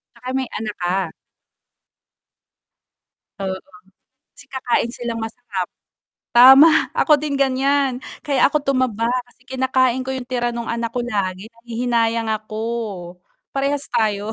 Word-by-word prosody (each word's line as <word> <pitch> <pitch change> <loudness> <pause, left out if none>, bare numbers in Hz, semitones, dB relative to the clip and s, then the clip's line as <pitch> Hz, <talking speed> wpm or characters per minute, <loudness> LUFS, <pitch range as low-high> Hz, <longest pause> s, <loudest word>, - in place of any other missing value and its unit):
'Tsaka 250 +2 -7
may 260 -2 -1
anak 215 -1 -4
ka. 180 -1 -1 2.3
Oo, 190 -1 -2 0.8
kasi - - -16
kakain 245 -2 0
silang 235 -1 -4
masarap. 225 -4 -4 0.7
Tama, 265 +6 +9 0.3
ako 305 - +3
din 295 -2 -2
ganiyan 270 -1 +1 0.2
kaya 280 -3 0
ako 300 - -1
tumaba 255 -5 0 0.2
kasi 250 - -27
kinakain 260 -1 +1
ko 255 - -6
'yong 255 - -5
tira 245 -1 -1
no'ng 235 0 -4
anak 230 0 -2
ko 245 - 0
lagi 195 -4 -2
nahihinayang 230 -1 -1
ako. 215 0 -5 1.0
Parehas 280 +1 -1
tayo. 210 -1 0
240 Hz, 120 wpm, -20 LUFS, 225-260 Hz, 2.3 s, Tama